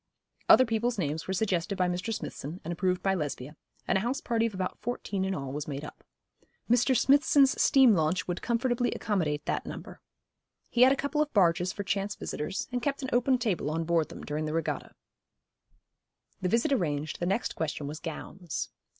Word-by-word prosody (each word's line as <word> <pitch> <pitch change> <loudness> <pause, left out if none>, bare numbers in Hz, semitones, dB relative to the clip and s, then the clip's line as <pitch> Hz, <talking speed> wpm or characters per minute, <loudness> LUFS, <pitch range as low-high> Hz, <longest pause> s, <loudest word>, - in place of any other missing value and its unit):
Other 255 - +8
people's 230 +1 0
names 155 -3 -2
were 190 - -1
suggested 195 -1 0
by 180 - +2
Mr. 180 +5 -2
Smithson 170 -5 -5
and 165 - -4
approved 180 +1 0
by 195 - +2
Lesbia, 150 -4 -4 0.3
and 195 - +3
a - - -3
house 250 +6 -1
party 230 -3 +1
of 215 - -7
about 185 -1 -3
fourteen 210 -5 -3
in 190 0 -1
all 135 -2 -4
was 145 +1 -4
made 145 0 -4
up. - - -11 0.6
Mr. 245 +2 +3
Smithson's 280 +1 +4
steam 265 -4 +6
launch 160 0 +1
would 175 0 -3
comfortably 240 +1 0
accommodate 160 -8 -1
that - - -1
number. - - -8 0.7
He 240 - +1
had 255 +1 +8
a - - +4
couple 285 +2 -1
of 300 -1 0
barges 180 -3 +3
for 200 - -5
chance 200 +1 -1
visitors, 150 +6 -4
and 245 0 -1
kept 280 +1 -2
an 260 - -3
open 250 +2 +3
table 205 - -1
on 165 +2 -1
board 165 -1 +1
them - - -9
during 150 +1 -3
the 155 - -3
regatta. 165 0 -3 1.5
The 180 - 0
visit 235 +8 +2
arranged, 155 - -1
the 175 - -1
next 195 +5 -1
question 155 -2 -3
was 150 +2 -5
gowns. 165 0 -5
190 Hz, 195 wpm, -29 LUFS, 160-240 Hz, 1.5 s, Other